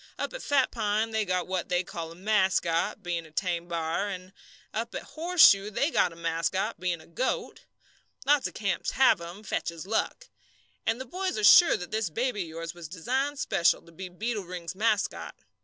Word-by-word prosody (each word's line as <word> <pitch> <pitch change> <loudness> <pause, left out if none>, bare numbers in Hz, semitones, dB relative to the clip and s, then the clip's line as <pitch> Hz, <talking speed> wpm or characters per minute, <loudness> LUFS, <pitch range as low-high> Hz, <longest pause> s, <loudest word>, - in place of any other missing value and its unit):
"Up - - -3
at - - -6
Fat 275 -3 +2
Pine 220 0 0
they 220 -1 0
got 185 -1 0
what 185 -1 -3
they 180 0 +1
call 165 -2 -6
a - - -11
mascot, 190 -2 +1
bein' 175 -2 -2
a 160 - -14
tame 175 +1 -2
b'ar; 170 +4 -1
an' 185 0 -7 0.4
up 230 +2 -3
at - - -4
Horseshoe 315 - +5
they 280 +9 0
got 180 - +2
a - - -12
mascot, 170 +6 -1
bein' 180 -2 -1
a - - -16
goat. 250 +10 -3 0.6
Lots 290 -1 +3
of - - -12
camps 200 -3 -1
have 260 -9 +4
'em 175 +5 -9
fetches 170 -4 -3
luck. 225 - -2 0.6
And 225 +2 +1
the 260 - -5
boys 370 +2 -3
are 215 - -2
sure 335 - +8
that 180 - -8
this 220 -4 -1
baby 230 +4 -1
of 175 - -4
yours 165 +1 -6
was 175 -2 -9
designed 260 - -2
special 170 -9 +2
to 170 - -17
be 185 +3 -8
Beetle 210 +2 -3
Ring's 175 -1 -6
mascot. 210 0 -1
190 Hz, 195 wpm, -28 LUFS, 170-225 Hz, 0.6 s, sure